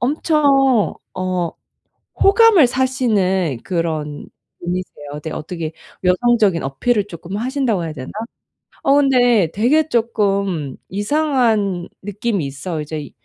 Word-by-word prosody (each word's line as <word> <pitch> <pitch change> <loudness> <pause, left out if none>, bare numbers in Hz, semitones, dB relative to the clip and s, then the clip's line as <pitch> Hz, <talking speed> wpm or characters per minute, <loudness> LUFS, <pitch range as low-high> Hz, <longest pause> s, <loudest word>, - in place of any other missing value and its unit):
엄청 275 -4 +2 0.2
어 185 -2 -1 0.7
호감을 395 - +6
사시는 205 - 0
그런 155 -4 -3 0.3
분이세요. 180 +1 -4 0.3
네. 160 - -5
어떻게 160 0 -5 0.3
여성적인 200 -1 +2
어필을 200 - 0
쪼끔 180 +1 -7
하신다고 245 -6 -1
해야 155 - -5
되나? 130 -3 -8 0.7
어 275 - +4
근데 245 - +4
되게 285 +9 +2
쪼끔 200 - 0
이상한 215 - 0
느낌이 205 -2 -2
있어요. 155 +4 -5
이제, 150 -1 -6
200 Hz, 245 characters per minute, -19 LUFS, 170-255 Hz, 0.7 s, 호감을